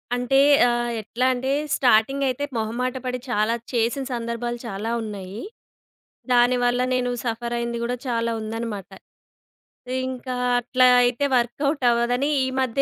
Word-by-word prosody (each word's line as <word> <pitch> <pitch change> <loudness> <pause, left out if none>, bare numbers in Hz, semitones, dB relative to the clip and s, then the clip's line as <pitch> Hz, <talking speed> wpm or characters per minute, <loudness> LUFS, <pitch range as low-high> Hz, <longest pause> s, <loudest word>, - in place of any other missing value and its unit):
అంటే, 250 +2 +1 0.3
ఆహ్, 240 0 0
ఎట్లా 235 +4 -2
అంటే, 255 +1 -3 0.3
స్టార్టింగ్ 255 +3 +3
అయితే 260 +2 -2
మొహమాట 235 +3 -2
పడి 250 0 -2
చాలా 215 0 +1 0.2
చేసిన 235 +3 0
సందర్భాలు 235 0 -3
చాలా 210 +2 -4
ఉన్నాయి. 205 -1 -7 0.9
దానివల్ల 245 0 +3
నేను 250 -1 0
సఫర్ 235 0 -3
అయ్యింది 235 0 -2
కూడా 245 +1 -1
చాలా 230 -1 0
ఉందన్నమాట. 220 -3 -5 1.2
ఇంకా 255 0 -5 0.2
అట్లా 255 +1 +3 0.2
అయితే 245 +3 +1
వర్క్‌అవుట్ 275 +4 -1
అవ్వదని 245 +4 +1 0.2
ఈ - - -1
మధ్య 260 +1 0
240 Hz, 125 wpm, -23 LUFS, 230-250 Hz, 1.2 s, స్టార్టింగ్